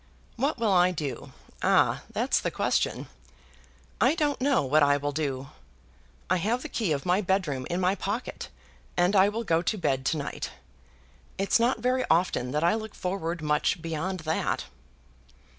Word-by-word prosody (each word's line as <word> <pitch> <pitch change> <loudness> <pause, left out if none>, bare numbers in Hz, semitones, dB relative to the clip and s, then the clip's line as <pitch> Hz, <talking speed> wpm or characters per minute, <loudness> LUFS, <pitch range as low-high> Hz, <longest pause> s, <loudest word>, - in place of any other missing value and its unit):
"What 275 +5 0
will 225 -3 +1
I 180 -1 +5
do? 150 -8 -5 0.3
Ah! - - +3
That's - - +1
the - - -1
question. - - 0 1.0
I 265 +6 +4
don't 295 -5 0
know 275 - +3
what 145 +3 +3
I 145 0 +4
will 145 +1 -2
do. 140 -3 -3 0.8
I 185 - +2
have 225 +8 -1
the - - -6
key 215 -8 -1
of 140 +1 -1
my 180 +3 +2
bedroom 175 -10 -1
in 175 - -1
my 185 +1 +2
pocket, 205 +4 -4 0.5
and 180 +3 +3
I 195 +1 +6
will 225 +3 -3
go 165 -5 +2
to 210 +5 -1
bed 135 -7 0
to 160 - +1
night. 145 - -4 0.9
It's 195 +4 +2
not 235 -1 +1
very 255 +2 +1
often 165 -7 +2
that 150 +4 -1
I 170 - +4
look 220 -1 -5
forward 175 -3 -3
much 150 +3 +1
beyond 165 +3 -3
that." 160 0 -1
180 Hz, 170 wpm, -27 LUFS, 150-215 Hz, 1.0 s, I